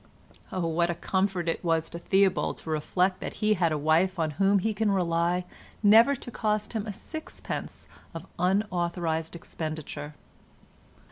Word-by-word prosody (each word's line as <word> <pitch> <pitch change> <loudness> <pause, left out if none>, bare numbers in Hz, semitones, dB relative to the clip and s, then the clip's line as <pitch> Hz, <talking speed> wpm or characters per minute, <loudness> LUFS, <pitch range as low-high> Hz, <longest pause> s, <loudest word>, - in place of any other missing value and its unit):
Oh, 185 -2 -1
what 170 +1 +1
a 175 - -1
comfort 190 -1 -1
it 165 - -1
was 165 -1 +1
to 170 - -6
Theobald 190 +1 +2
to 160 - -6
reflect 180 +5 +1
that - - -5
he 215 0 +2
had 170 -5 +1
a 155 - 0
wife 165 +6 +2
on 160 -2 0
whom 195 +6 +3
he 215 +3 0
could 210 +1 +1
rely 175 -1 +1 0.4
never 225 +7 +7
to 245 - -9
cost 215 -1 -1
him 220 -1 -3
a - - -2
sixpence 315 +10 -7 0.3
of 165 +1 -8
unauthorised 175 -4 0
expenditure! 155 -2 -6
180 Hz, 155 wpm, -27 LUFS, 165-200 Hz, 0.4 s, never